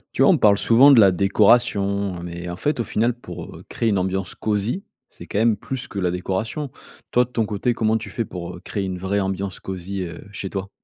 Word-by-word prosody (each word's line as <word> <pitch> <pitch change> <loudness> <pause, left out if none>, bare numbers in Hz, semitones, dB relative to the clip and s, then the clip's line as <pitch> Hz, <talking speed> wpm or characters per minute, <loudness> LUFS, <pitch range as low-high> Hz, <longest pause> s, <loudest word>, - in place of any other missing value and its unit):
Tu - - +4
vois, - - +7
on - - +4
parle 100 -1 +5
souvent 130 +5 +6
de 130 - +7
la 100 -3 +7
décoration, 100 -1 +2
heu, - - -8
mais 85 0 -6
en 85 - -5
fait 145 -4 0
au - - 0
final 115 +3 0
pour, 120 - -9
heu, - - -12
créer 115 - -1
une 100 - +2
ambiance 95 0 -1
cosy, 110 - -1 0.3
c'est 85 - -12
quand 100 - -2
même 115 -1 +3
plus 130 +5 -5
que 100 - -6
la 90 -2 0
décoration. 95 - -3 0.4
Toi, 125 - +4
de 125 - -9
ton 115 -3 0
côté, 105 +4 -1
comment 110 -1 +1
tu 110 -2 -7
fais 115 +4 -3
pour, 85 -3 -7
heu, - - -12
créer 100 +2 -4
une 95 -1 -3
vraie 95 +3 -1
ambiance 95 0 -3
cosy, 95 +1 -5
heu, 85 +1 -8
chez 100 -1 -5
toi? 95 0 -5
100 Hz, 245 wpm, -22 LUFS, 95-115 Hz, 0.4 s, vois